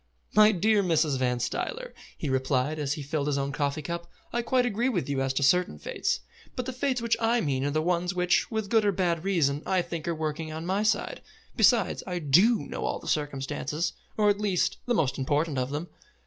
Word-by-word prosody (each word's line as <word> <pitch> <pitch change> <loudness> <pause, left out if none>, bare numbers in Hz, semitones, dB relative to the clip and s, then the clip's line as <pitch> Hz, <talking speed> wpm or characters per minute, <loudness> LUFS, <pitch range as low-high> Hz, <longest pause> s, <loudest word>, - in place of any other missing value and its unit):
"My 215 0 +7
dear 210 +2 +3
Mrs. 160 -6 +1
Van 125 -1 +1
Stuyler," 475 - -3 0.2
he 155 - -4
replied, 130 +2 0
as 145 -1 -1
he 150 - -6
filled 145 0 -2
his 145 -1 0
own 140 0 -1
coffee 145 +1 -2
cup, 170 0 -5 0.2
"I 240 - +1
quite 250 +1 +2
agree 240 +2 0
with 180 - -1
you 140 -2 -1
as 135 0 0
to 140 - 0
certain 180 - +3
fates, - - -2 0.3
but 250 - -3
the 260 - -4
Fates 255 -1 -1
which 235 - +2
I 230 +1 +2
mean 135 - -1
are - - +1
the 155 +2 0
ones 180 +1 0
which, 180 0 +2
with 220 -3 -3
good 225 -2 +4
or 205 - +3
bad 175 -3 0
reason, 155 -7 +1
I 185 -2 +1
think 170 -2 -6
are 170 - 0
working 155 0 -3
on 160 +1 -5
my 190 +3 0
side. 210 -1 0 0.3
Besides, - - +3
I 180 -1 -2
do 180 - +4
know - - -5
all - - -1
the - - -11
circumstances, 150 +2 -2 0.2
or 210 -1 +3
at 205 +1 -3
least 195 -4 +1
the 240 - +2
most 140 -8 0
important 145 +1 0
of 125 0 -1
them. 150 +5 -4
170 Hz, 220 wpm, -27 LUFS, 145-205 Hz, 0.3 s, My